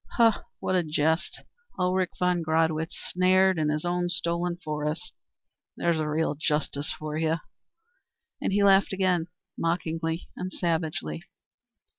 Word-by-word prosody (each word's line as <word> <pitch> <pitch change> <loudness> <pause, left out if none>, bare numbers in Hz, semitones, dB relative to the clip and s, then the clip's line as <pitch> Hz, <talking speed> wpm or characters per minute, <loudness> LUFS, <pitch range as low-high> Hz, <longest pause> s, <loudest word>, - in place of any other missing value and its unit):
Ho, 230 -2 +7 0.3
what - - -1
a 185 - +4
jest, 160 0 0 0.3
Ulrich 185 0 +1
von 180 -1 +2
Gradwitz 160 0 +1
snared 185 0 +4
in 155 -1 +1
his 150 +2 -1 0.2
stolen 170 0 0
forest. 155 +4 -3 0.6
There's 170 -2 +1
real 155 0 0
justice 150 -1 -1
for 155 0 -4
you!" 160 0 +1 1.0
And - - 0
he 200 +1 +3
laughed 195 0 +5
again, 185 -3 +1 0.3
mockingly 165 0 -1
and 185 0 -4
savagely. 160 - -2
165 Hz, 120 wpm, -27 LUFS, 155-180 Hz, 1.0 s, Ho